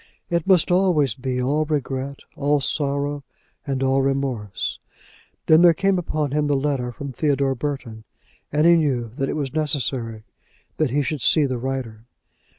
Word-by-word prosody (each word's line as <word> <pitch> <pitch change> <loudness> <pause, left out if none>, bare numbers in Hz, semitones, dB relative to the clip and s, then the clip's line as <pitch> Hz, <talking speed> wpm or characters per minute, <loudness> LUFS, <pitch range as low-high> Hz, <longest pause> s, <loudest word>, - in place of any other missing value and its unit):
It 170 -1 0
must 180 -3 +4
always 175 - +3
be 125 +1 -3
all 140 +5 +1
regret, 140 -2 -3
all 145 +1 +1
sorrow, 140 0 -1 0.4
and 135 -1 -1
all 135 0 +2
remorse. 135 -7 -2 0.7
Then 155 +1 +6
there 175 -2 +6
came 195 +1 +1
upon 155 -4 -2
him 150 0 +1
the 145 - +2
letter 135 -3 -1
from 140 +3 -7
Theodore 140 -1 +1
Burton, 125 -5 -5 0.5
and 150 +2 +2
he 170 - +7
knew 130 -8 0
that 135 - -1
it - - -2
was 140 -3 -3
necessary 130 -7 -2 0.5
that 155 -3 +1
he 145 +4 +1
should 145 0 -3
see 155 +4 +4
the 130 -3 -2
writer. 120 -4 -4
140 Hz, 160 wpm, -22 LUFS, 130-150 Hz, 0.7 s, he